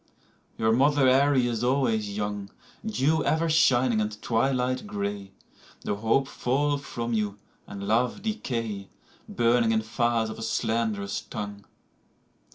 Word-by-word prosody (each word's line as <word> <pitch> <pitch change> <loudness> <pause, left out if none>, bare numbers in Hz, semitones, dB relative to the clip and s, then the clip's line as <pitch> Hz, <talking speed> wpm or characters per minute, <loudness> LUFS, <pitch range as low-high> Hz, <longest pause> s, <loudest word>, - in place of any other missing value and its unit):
Your 110 0 +2
mother 140 +2 +4
Erie 135 0 +4
is 120 -1 -1
always 115 -6 +1
young, 105 -1 -3 0.3
Dew 160 -8 +1
ever 160 +1 +1
shining 130 -7 +3
and 105 0 -3
twilight 125 0 0
gray; 100 -1 -4 0.5
Though - - -2
hope 115 +6 +1
fall 145 +3 0
from 120 -4 -4
you 105 -2 -1 0.3
and 100 -1 -7
love 125 - +1
decay. 115 - -3 0.4
Burning 115 -1 +2
in 110 -1 +1
fires 115 0 0
of 110 - -9
a - - -7
slanderous 110 -3 -1
tongue. 100 -1 -7
115 Hz, 130 wpm, -26 LUFS, 105-130 Hz, 0.5 s, mother